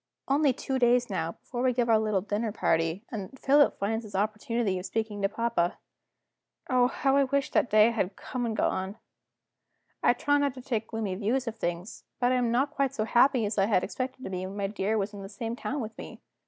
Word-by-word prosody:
Only 280 +1 +3
two 265 +1 -3
days 245 -1 +3
now, 170 -3 -2
before 245 -1 -6
we 255 0 +3
give 240 -1 +1
our 225 -2 +5
little 215 -3 +1
dinner 210 +3 -2
party, 165 +1 0
and 215 +2 -6
Philip 285 +1 +4
finds 220 +3 -1
his 205 -2 -10
opportunity 215 0 0
of 180 - -6
speaking 220 -2 -3
to 195 - +2
papa. 220 -5 0 0.9
Oh, 250 -1 +5
how 270 +1 +1
I 280 - +4
wish 280 +1 0
that - - +2
day 215 +2 +6
had 200 -4 -1
come 250 -1 -5
and 220 -1 -3
gone! 190 +3 -1 1.0
I - - +5
try 290 -1 +2
not 285 -2 0
to 255 - -8
take 225 -5 -2
gloomy 220 -4 -3
views 225 +7 0
of 225 0 -4
things; 175 0 -4 0.2
but 245 0 +3
I - - +3
am 245 -2 +1
not 265 +4 +1
quite 275 -3 -1
so 215 - 0
happy 240 +1 +4
as 210 0 -1
I 195 - +3
had 200 -4 +2
expected 260 +4 -4
to 190 - -5
be 185 0 -3
when 195 +2 -8
my 200 - -1
dear 205 +2 -1
was 205 0 -2
in 200 - -8
the 195 - -8
same 225 +3 -4
town 275 +3 -3
with 220 -1 -6
me. - - -9
225 Hz, 225 wpm, -28 LUFS, 200-255 Hz, 1.0 s, day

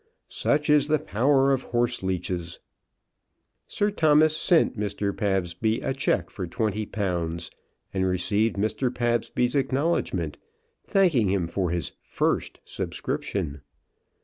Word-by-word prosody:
Such 150 +1 0
is 150 -1 +4
the 155 0 +3
power 135 +1 +2
of 130 - -1
horseleeches. 95 -7 -1 1.1
Sir 205 0 0
Thomas 155 -4 +4
sent 170 0 +3
Mr. 100 -1 -2
Pabsby 95 +1 0
a - - -1
cheque 135 - 0
for 90 -3 -5
twenty 105 +3 -2
pounds, 85 -5 -2 0.4
and 95 -1 +1
received 100 +4 +1
Mr. 110 +5 0
Pabsby's 120 +1 0
acknowledgment, 135 - 0 0.5
thanking 160 - +3
him 95 -3 0
for 90 +1 -1
his 85 -3 -2
"first" - - -1
subscription. 75 -8 -4
110 Hz, 115 wpm, -26 LUFS, 95-135 Hz, 1.1 s, is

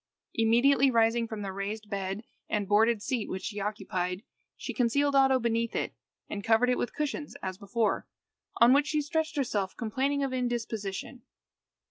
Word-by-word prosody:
Immediately 245 +4 +4
rising 230 -1 +3
from 220 -2 -5
the 195 - -3
raised 205 +3 -4
and 200 +1 -4
boarded 215 +1 +3
seat 235 -3 -2
which 190 - -4
she 205 -1 -4
occupied, 190 -2 -3 0.3
she - - -5
concealed 280 +3 +2
Oddo 270 -1 +5
beneath 230 -1 0
it, - - -1 0.3
and 205 -1 -5
covered 230 +3 +4
it 250 - +1
with - - -3
cushions 300 0 -3
as 185 0 -4
before, 215 +2 0 0.5
on 235 +2 +7
which 285 +1 +4
she 305 -1 0
stretched 320 +1 -1
herself 210 -9 -1
complaining 265 +5 0
of 270 -1 -2
indisposition. 240 -2 -3
230 Hz, 155 wpm, -29 LUFS, 205-260 Hz, 0.5 s, on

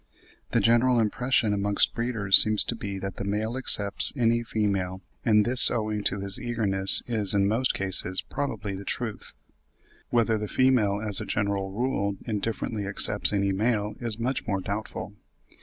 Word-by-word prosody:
The - - +1
general 120 +1 +3
impression 115 0 0
amongst 100 0 0
breeders 115 -5 +1
seems 110 -1 +3
to 120 - -3
be 100 -3 -6
that 95 0 -6
the - - -4
male 105 +4 -3
accepts 100 -6 +4
any 115 -1 +1
female; 100 -5 -2 0.2
and 105 -2 +3
this 125 +1 +7
owing 105 -3 -3
to 100 0 -1
his 100 -1 -6
eagerness, 100 -5 +2
is, 105 -4 -2
in 100 0 +2
most 115 +5 0
cases, 95 -1 -1
probably 135 -8 -5
the 95 +1 -7
truth. 110 +1 -6 0.7
Whether 115 -2 +1
the 105 - -5
female 115 -5 +1
as 100 -3 0
a - - -5
general 100 -2 -2
rule 100 -3 -2
indifferently 110 -1 -4
accepts 100 +1 +2
any 100 -1 0
male 105 0 -1
is 115 -3 -4
much 125 +3 -3
more 100 -3 -1
doubtful. 100 +2 -6
105 Hz, 160 wpm, -25 LUFS, 100-115 Hz, 0.7 s, this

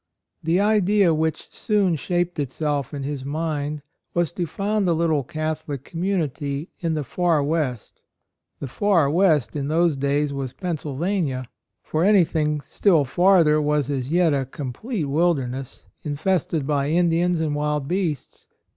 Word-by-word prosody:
"' - - -61
The 165 +3 +2
idea 205 -3 +3
which 160 0 -2
soon 205 -6 +1
shaped 175 +2 -1
itself 145 0 -2
in 140 -2 -5
his 140 -1 -4
mind 150 0 -3 0.3
was 175 -2 +1
to 175 -1 -3
found 200 +1 -1
a - - +3
little 160 -3 +1
Catholic 155 -3 -4
community 160 -4 -2
in 165 -2 -1
the 150 - -1
far 165 +1 +1
West. 140 -6 -2 0.6
The 140 - -5
"far 170 - +2
West" 160 -7 +2
in 140 -1 -2
those 165 0 +2
days 140 +1 0
was 135 -2 -4
Pennsylvania; 155 -3 -2 0.4
for 155 +1 -1
anything 160 -7 +3
still 165 -2 +2
farther 170 -1 +4
was 150 -2 0
as 130 -2 -2
yet 170 -1 +3
a 135 -2 -1
complete 150 - -4
wilderness, 135 -4 -1 0.2
in 145 -1 -3
fested 170 -3 0
by 140 -1 0
Indians 170 +1 +2
and 155 -2 -1
wild 150 -1 -1
beasts. 175 -5 -3
155 Hz, 145 wpm, -23 LUFS, 145-175 Hz, 0.6 s, farther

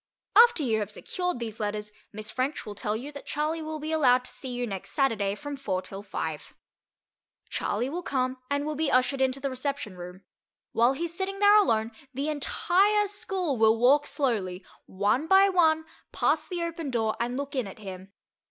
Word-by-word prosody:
After 470 -8 +7
you 225 -4 +1
have 210 - -3
secured 360 -4 -3
these 225 -2 -6
letters, 210 0 -3 0.2
Miss 215 +1 -6
French 265 +4 -2
will 210 - -6
tell 210 +1 -2
you 275 +6 -7
that 285 - -10
Charley 310 +3 -1
will 310 0 -5
be 310 +1 -4
allowed 255 -5 +4
to - - -7
see 265 - -8
you 245 0 -2
next 195 -5 -6
Saturday 215 -8 +1
from 290 +5 -6
four 270 -9 -2
till 195 0 -8
five. 160 -6 -5 1.0
Charley 225 +5 -1
will 335 +6 -3
come 255 -5 -1
and 285 +1 0
will 305 - -2
be 310 0 0
ushered 255 +2 +2
into 265 0 +1
the 275 0 -2
reception 260 -6 -3
room. 180 +2 -9 0.5
While 240 +3 +4
he 330 +5 -3
is 340 - -5
sitting 390 +2 -3
there 410 +1 +6
alone, 225 - +3 0.2
the 280 +3 -1
entire 385 +7 +2
school 385 - -2
will 220 0 +5
walk 280 +5 +4
slowly, 200 - -1 0.2
one 210 +10 0
by 390 +2 +6
one, 320 -4 +3 0.3
past 310 +1 +1
the 350 -2 -2
open 330 -3 -4
door 225 -3 0
and 240 +2 -1
look 280 0 -4
in 255 -6 -1
at 195 - -10
him. 190 -2 -9
270 Hz, 195 wpm, -27 LUFS, 220-315 Hz, 1.0 s, After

